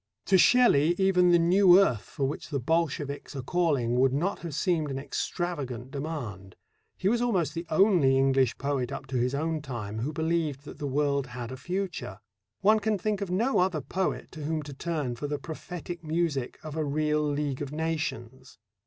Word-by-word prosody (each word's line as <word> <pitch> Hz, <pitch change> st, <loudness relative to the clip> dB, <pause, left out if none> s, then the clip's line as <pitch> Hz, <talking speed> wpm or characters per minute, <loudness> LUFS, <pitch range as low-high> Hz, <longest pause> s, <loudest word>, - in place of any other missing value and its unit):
To 190 Hz, -, +5 dB
Shelley 175 Hz, -, +5 dB
even 185 Hz, -2 st, +4 dB
the 175 Hz, -, +6 dB
new 180 Hz, +2 st, +6 dB
earth 125 Hz, -, +2 dB
for 140 Hz, -, -4 dB
which 145 Hz, -, -5 dB
the 140 Hz, -3 st, -1 dB
Bolsheviks 145 Hz, 0 st, -1 dB
are 135 Hz, -, -4 dB
calling 140 Hz, -7 st, +1 dB
would 130 Hz, 0 st, +4 dB
not 175 Hz, +8 st, -1 dB
have 165 Hz, -5 st, -6 dB
seemed 160 Hz, -2 st, 0 dB
an 135 Hz, -, -3 dB
extravagant 135 Hz, -3 st, -4 dB
demand. 130 Hz, -, -6 dB, 0.4 s
He 190 Hz, -, -1 dB
was 235 Hz, +3 st, +2 dB
almost 185 Hz, -, +1 dB
the 165 Hz, +1 st, -5 dB
only 160 Hz, -7 st, +4 dB
English 135 Hz, -2 st, +2 dB
poet 140 Hz, -3 st, -2 dB
up -, -, -5 dB
to 130 Hz, -, -3 dB
his 125 Hz, +3 st, 0 dB
own 160 Hz, +1 st, -1 dB
time 115 Hz, -7 st, -5 dB
who 130 Hz, +7 st, -2 dB
believed 160 Hz, -3 st, -1 dB
that -, -, -10 dB
the 145 Hz, -, -3 dB
world 140 Hz, 0 st, 0 dB
had 120 Hz, -1 st, -7 dB
a -, -, -5 dB
future. 175 Hz, -, -4 dB, 0.4 s
One 215 Hz, +2 st, +5 dB
can 215 Hz, 0 st, 0 dB
think 210 Hz, +1 st, -2 dB
of 200 Hz, -, -3 dB
no 225 Hz, +8 st, +1 dB
other 180 Hz, -3 st, +2 dB
poet 190 Hz, +6 st, -3 dB
to 155 Hz, -, -8 dB
whom 155 Hz, +1 st, -2 dB
to 145 Hz, 0 st, -8 dB
turn 150 Hz, -3 st, -2 dB
for 145 Hz, -, -4 dB
the 145 Hz, 0 st, -2 dB
prophetic 170 Hz, +4 st, -7 dB
music 155 Hz, -5 st, -1 dB
of 155 Hz, -1 st, -7 dB
a 160 Hz, -, 0 dB
real 150 Hz, +1 st, 0 dB
League 145 Hz, -2 st, -1 dB
of 145 Hz, -1 st, -4 dB
Nations. 140 Hz, -6 st, -4 dB
150 Hz, 190 wpm, -28 LUFS, 135-175 Hz, 0.4 s, the